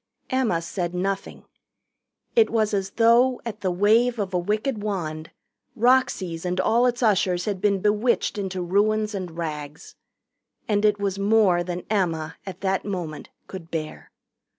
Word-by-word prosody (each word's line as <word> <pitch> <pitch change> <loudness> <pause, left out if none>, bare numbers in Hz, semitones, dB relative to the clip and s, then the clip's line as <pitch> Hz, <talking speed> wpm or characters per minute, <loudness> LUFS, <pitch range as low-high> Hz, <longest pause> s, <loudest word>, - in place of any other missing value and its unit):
Emma 235 -11 +1
said 175 0 -3
nothing. 195 +2 -3 0.9
It 455 -2 +5
was 220 -2 +1
as 195 -1 -1
though, 235 +3 +4
at 215 -2 -6
the 190 - 0
wave 220 +7 +3
of 195 -3 -3
a 180 - +2
wicked 215 +5 -1
wand, 160 -7 -4 0.5
Roxy's 220 -9 +2
and 180 0 -2
all 235 +6 +3
its 245 0 -1
ushers 185 -5 +2
had 200 -3 -3
been 200 -2 +2
bewitched 210 +1 +1
into 190 -2 -3
ruins 210 +4 +1
and 180 -4 -5
rags. 150 -2 -6 0.7
And 210 -1 +1
it 210 -1 +3
was 200 -1 -2
more 200 -4 +3
than 175 0 -5
Emma, 165 -7 -1
at 190 - -7
that 195 -1 0
moment, 175 -7 -5 0.2
could 185 -4 -9
bear. 155 -2 -5
195 Hz, 150 wpm, -24 LUFS, 175-215 Hz, 0.9 s, It